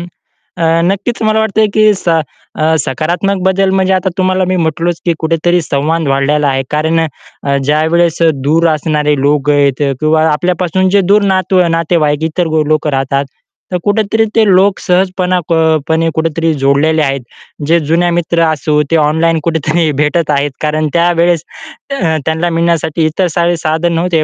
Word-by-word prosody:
अ, 170 Hz, -, -6 dB, 0.9 s
नक्कीच 210 Hz, +5 st, -3 dB
मला 215 Hz, 0 st, +2 dB
वाटतंय 220 Hz, 0 st, +1 dB
की 215 Hz, -, +4 dB, 0.2 s
स -, -, -10 dB, 0.5 s
अ, 160 Hz, +1 st, +1 dB
सकारात्मक 175 Hz, +8 st, -1 dB
बदल 190 Hz, 0 st, +2 dB
म्हणजे 190 Hz, 0 st, +1 dB
आता 185 Hz, 0 st, 0 dB
तुम्हाला 185 Hz, 0 st, +1 dB
मी 185 Hz, -, 0 dB
म्हटलोच 165 Hz, +2 st, -2 dB
की 170 Hz, -, +2 dB
कुठेतरी 165 Hz, +2 st, 0 dB
संवाद 155 Hz, +2 st, -1 dB
वाढलेला 140 Hz, +2 st, +1 dB
आहे. 135 Hz, -1 st, 0 dB
कारण 160 Hz, +2 st, 0 dB, 0.4 s
अ, 140 Hz, -1 st, 0 dB
ज्यावेळेस 160 Hz, +3 st, +1 dB
अ, 165 Hz, -, +5 dB, 0.2 s
दूर 165 Hz, +2 st, +3 dB
असणारे 150 Hz, -1 st, 0 dB
लोकं 145 Hz, 0 st, +1 dB
आहेत 140 Hz, -1 st, +1 dB, 0.2 s
किंवा 155 Hz, +1 st, +2 dB
आपल्यापासून 180 Hz, +3 st, 0 dB
जे 200 Hz, +1 st, +3 dB
दूर 210 Hz, -, +4 dB
नात 185 Hz, 0 st, -1 dB, 0.2 s
नातेवाईक 160 Hz, -2 st, 0 dB
इतर 170 Hz, +1 st, -1 dB, 0.2 s
लोकं 155 Hz, 0 st, 0 dB
राहतात. 135 Hz, +1 st, -1 dB, 0.5 s
तर 180 Hz, -, 0 dB
कुठेतरी 215 Hz, +2 st, +1 dB
ते 225 Hz, -, +4 dB
लोक 190 Hz, +1 st, +3 dB
सहजपणे 185 Hz, 0 st, 0 dB
क -, -, +2 dB
अ, 160 Hz, -1 st, +2 dB
पणे 165 Hz, 0 st, +1 dB
कुठेतरी 165 Hz, 0 st, 0 dB
जोडलेले 155 Hz, +3 st, +2 dB
आहेत. 135 Hz, -2 st, -1 dB, 0.5 s
जे 170 Hz, +2 st, +3 dB
जुन्या 170 Hz, +3 st, 0 dB
मित्र 170 Hz, 0 st, 0 dB
असो 150 Hz, 0 st, 0 dB
ते -, -, +3 dB
ऑनलाईन 160 Hz, +1 st, +1 dB
कुठेतरी 160 Hz, 0 st, 0 dB
भेटत 150 Hz, +1 st, -1 dB
आहेत. 140 Hz, 0 st, -1 dB
कारण 155 Hz, 0 st, -1 dB
त्यावेळेस 170 Hz, -1 st, +2 dB, 0.6 s
अ, 160 Hz, -4 st, 0 dB
त्यांना 160 Hz, +2 st, -1 dB
मिळण्यासाठी 165 Hz, -1 st, 0 dB
इतर 175 Hz, +4 st, 0 dB
सारे 170 Hz, 0 st, +1 dB
साधन 160 Hz, +2 st, -1 dB
नव्हते. 165 Hz, -1 st, 0 dB
165 Hz, 160 wpm, -12 LUFS, 155-180 Hz, 0.9 s, अ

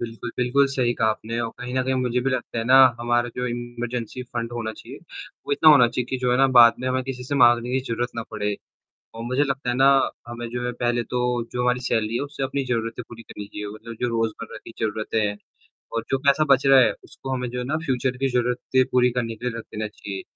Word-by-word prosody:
बिल्कुल, 120 Hz, 0 st, -6 dB
बिल्कुल, 125 Hz, +3 st, +3 dB
सही 125 Hz, -3 st, +1 dB
कहा 110 Hz, -, +1 dB
आपने 115 Hz, +2 st, -4 dB
और 115 Hz, -1 st, -2 dB
कहीं 125 Hz, 0 st, -6 dB
न 130 Hz, -, +1 dB
कहीं 130 Hz, +1 st, 0 dB
मुझे 125 Hz, -1 st, 0 dB
भी 135 Hz, +2 st, 0 dB
लगता 125 Hz, -2 st, -3 dB
है 115 Hz, -, -1 dB
ना, 130 Hz, +2 st, +5 dB, 0.2 s
हमारा 120 Hz, 0 st, +1 dB
जो 125 Hz, 0 st, -2 dB
इमरजेंसी 120 Hz, 0 st, -5 dB
फंड 120 Hz, -1 st, -5 dB
होना 115 Hz, -2 st, -3 dB
चाहिए, -, -, -11 dB, 0.5 s
वो -, -, -1 dB
इतना 155 Hz, +2 st, +6 dB
होना 140 Hz, -5 st, +7 dB
चाहिए 120 Hz, +1 st, -2 dB
कि 130 Hz, -, 0 dB
जो 125 Hz, -1 st, 0 dB
है 125 Hz, -, +3 dB
ना 135 Hz, -, +6 dB
बाद 120 Hz, -1 st, +9 dB
में 130 Hz, -, -4 dB
हमें 130 Hz, 0 st, 0 dB
किसी 125 Hz, -1 st, -6 dB
से 145 Hz, -, -3 dB
माँगने 120 Hz, -2 st, +4 dB
की 130 Hz, +1 st, +1 dB
ज़रूरत 120 Hz, +1 st, -1 dB
ना 115 Hz, -, -2 dB
पड़े। 105 Hz, -2 st, -2 dB, 0.6 s
और 115 Hz, -, -7 dB
मुझे 130 Hz, +4 st, 0 dB
लगता 140 Hz, -2 st, -2 dB
है -, -, -1 dB
ना, 135 Hz, +1 st, +5 dB, 0.4 s
हमें 120 Hz, 0 st, -6 dB
जो 120 Hz, +1 st, -4 dB
है 125 Hz, -, -2 dB
पहले 120 Hz, 0 st, +1 dB
तो 125 Hz, +1 st, -3 dB, 0.3 s
जो 125 Hz, -, -1 dB
हमारी 125 Hz, 0 st, +1 dB
सैलरी 110 Hz, -3 st, -1 dB
है, 120 Hz, -, 0 dB
उससे 145 Hz, -1 st, -6 dB
अपनी 135 Hz, +1 st, -1 dB
ज़रूरतें 115 Hz, -1 st, -2 dB
पूरी 115 Hz, -1 st, -11 dB
करनी 105 Hz, -2 st, -9 dB
चाहिए 105 Hz, +1 st, -7 dB
मतलब 115 Hz, +2 st, -9 dB
जो 125 Hz, -, +1 dB
रोज़मर्रा 115 Hz, -1 st, -3 dB
की -, -, -10 dB
ज़रूरतें 110 Hz, 0 st, -1 dB
हैं 105 Hz, -, -3 dB, 0.6 s
और 115 Hz, -, -1 dB
जो 135 Hz, -, +3 dB
पैसा 140 Hz, +2 st, +5 dB
बच 135 Hz, 0 st, +4 dB
रहा 135 Hz, -1 st, +7 dB
है 115 Hz, -4 st, +5 dB
उसको 135 Hz, -, -10 dB
हमें 125 Hz, -1 st, -3 dB
जो 125 Hz, -, -6 dB
है -, -, -2 dB
ना 150 Hz, +5 st, -1 dB
फ्यूचर 130 Hz, -1 st, -1 dB
की 135 Hz, +1 st, 0 dB
ज़रूरतें 125 Hz, +1 st, +1 dB
पूरी 125 Hz, 0 st, +4 dB
करने 115 Hz, -2 st, -2 dB
के 120 Hz, +3 st, -9 dB
लिए 115 Hz, -, -6 dB
रख 115 Hz, -, -6 dB
देना 110 Hz, 0 st, -3 dB
चाहिए। 100 Hz, -2 st, -7 dB
120 Hz, 250 wpm, -23 LUFS, 115-130 Hz, 0.6 s, बाद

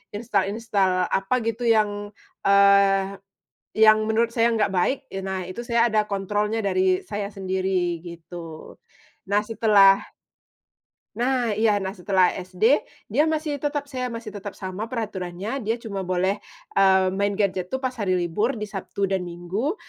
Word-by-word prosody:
install-install, 200 Hz, -3 st, 0 dB
apa 195 Hz, +6 st, +1 dB
gitu 230 Hz, +2 st, -2 dB
yang, 205 Hz, -2 st, +1 dB, 0.3 s
eee, 200 Hz, 0 st, +4 dB, 0.6 s
yang 215 Hz, 0 st, +6 dB
menurut 230 Hz, +1 st, +1 dB
saya 230 Hz, 0 st, +3 dB
enggak 215 Hz, -4 st, +1 dB
baik, 255 Hz, +10 st, 0 dB
ye 195 Hz, -, -3 dB
nah 190 Hz, -1 st, -4 dB
itu 185 Hz, +6 st, -7 dB
saya 235 Hz, 0 st, +2 dB
ada 215 Hz, -1 st, +2 dB
kontrolnya, 210 Hz, +2 st, -1 dB
dari 185 Hz, -1 st, +1 dB
saya 205 Hz, -1 st, -4 dB
sendiri, 185 Hz, -3 st, -1 dB
gitu. 170 Hz, -1 st, -10 dB, 0.5 s
Nah 205 Hz, +1 st, +2 dB
setelah 205 Hz, -3 st, +5 dB, 1.2 s
Nah 245 Hz, -1 st, +1 dB
iya, 215 Hz, -2 st, +2 dB
nah 190 Hz, -, -2 dB
setelah 185 Hz, 0 st, +3 dB
SD, 185 Hz, +9 st, +1 dB, 0.2 s
dia 280 Hz, +9 st, +3 dB
masih 310 Hz, -2 st, -1 dB
tetap 290 Hz, 0 st, -3 dB
saya 255 Hz, -3 st, -4 dB
masih 230 Hz, -1 st, -6 dB
tetap 205 Hz, -1 st, -7 dB
sama 190 Hz, +3 st, -5 dB
peraturannya, 205 Hz, -1 st, -4 dB
dia 225 Hz, +2 st, +1 dB
cuma 200 Hz, -4 st, -5 dB
boleh, 185 Hz, +2 st, 0 dB, 0.4 s
eee, 190 Hz, -1 st, +5 dB
main 200 Hz, +2 st, 0 dB
gadget 190 Hz, -2 st, -1 dB
tuh 265 Hz, -, -1 dB
pas 260 Hz, -, 0 dB
hari 205 Hz, -7 st, -1 dB
libur 180 Hz, +8 st, 0 dB
di 210 Hz, -3 st, -5 dB
Sabtu 195 Hz, 0 st, -3 dB
dan 190 Hz, -2 st, -1 dB
Minggu, 175 Hz, -, -3 dB
200 Hz, 150 wpm, -24 LUFS, 190-225 Hz, 1.2 s, yang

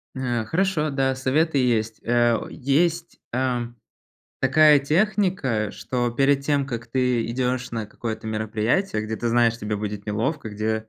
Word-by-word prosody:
Э, 120 Hz, -3 st, -2 dB
хорошо, 160 Hz, -, 0 dB
да, 135 Hz, -1 st, +1 dB
советы 140 Hz, +4 st, +1 dB
есть, 115 Hz, -4 st, 0 dB
а, 120 Hz, -1 st, +2 dB
есть, 165 Hz, +5 st, 0 dB
а, 125 Hz, -1 st, 0 dB, 0.8 s
такая 150 Hz, +3 st, +6 dB
техника, 160 Hz, -, 0 dB
что 120 Hz, -2 st, -2 dB
перед 135 Hz, +3 st, +2 dB
тем, 140 Hz, -1 st, +1 dB
как 120 Hz, -4 st, -5 dB
ты 125 Hz, -1 st, 0 dB
идёшь 125 Hz, +1 st, -2 dB
на 110 Hz, -2 st, -3 dB
какое-то 110 Hz, 0 st, -6 dB
мероприятие, 110 Hz, -, -1 dB
где 110 Hz, 0 st, -4 dB
ты 120 Hz, -, -3 dB
знаешь, 115 Hz, 0 st, +3 dB
тебе 105 Hz, -1 st, -3 dB
будет 105 Hz, 0 st, -5 dB
неловко, 110 Hz, +4 st, -2 dB
где 110 Hz, +1 st, -2 dB
125 Hz, 145 wpm, -23 LUFS, 110-140 Hz, 0.8 s, такая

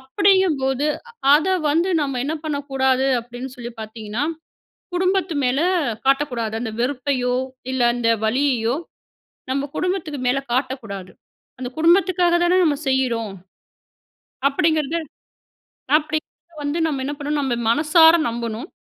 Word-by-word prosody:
அப்படிங்கும்போது, 295 Hz, -4 st, +2 dB, 0.5 s
அத 305 Hz, +4 st, +3 dB, 0.2 s
வந்து 335 Hz, +5 st, +2 dB
நம்ப 275 Hz, -3 st, -2 dB
என்ன 300 Hz, +3 st, -1 dB
பண்ணக்கூடாது 270 Hz, -3 st, 0 dB
அப்டீன்னு 245 Hz, +2 st, -8 dB
சொல்லி 240 Hz, -1 st, -6 dB
பாத்தீங்கன்னா, 220 Hz, +3 st, -4 dB, 0.7 s
குடும்பத்து 370 Hz, -1 st, +1 dB
மேல 255 Hz, +4 st, +1 dB, 0.5 s
காட்டக்கூடாது. 265 Hz, -5 st, +1 dB
அந்த 225 Hz, -3 st, -4 dB
வெறுப்பையோ 255 Hz, -1 st, 0 dB, 0.4 s
இல்ல, 260 Hz, -, -2 dB
அந்த 240 Hz, -1 st, 0 dB, 0.2 s
வலியையோ 245 Hz, 0 st, +1 dB, 0.8 s
நம்ப 275 Hz, +1 st, 0 dB
குடும்பத்துக்கு 360 Hz, -5 st, -2 dB
மேல 260 Hz, +2 st, +2 dB
காட்டக்கூடாது. 235 Hz, -8 st, -3 dB, 0.5 s
அந்த 255 Hz, -1 st, -4 dB
குடும்பத்துக்காக 350 Hz, +1 st, +4 dB
தானே 355 Hz, +1 st, +3 dB
நம்ப 300 Hz, -3 st, +2 dB
செய்யுறோம். 240 Hz, -5 st, 0 dB, 1.2 s
அப்படிங்குறது 315 Hz, +2 st, +1 dB, 1.0 s
அப்படி 310 Hz, 0 st, -2 dB, 0.5 s
வந்து 290 Hz, +4 st, -1 dB
நம்ப 290 Hz, -4 st, -2 dB
என்ன 290 Hz, -, -2 dB
பண்ணனும்? 295 Hz, 0 st, -1 dB
நம்ப 250 Hz, -3 st, -1 dB
மனசார 320 Hz, +4 st, +6 dB
நம்பனும், 235 Hz, +3 st, -4 dB
275 Hz, 110 wpm, -21 LUFS, 245-315 Hz, 1.2 s, மனசார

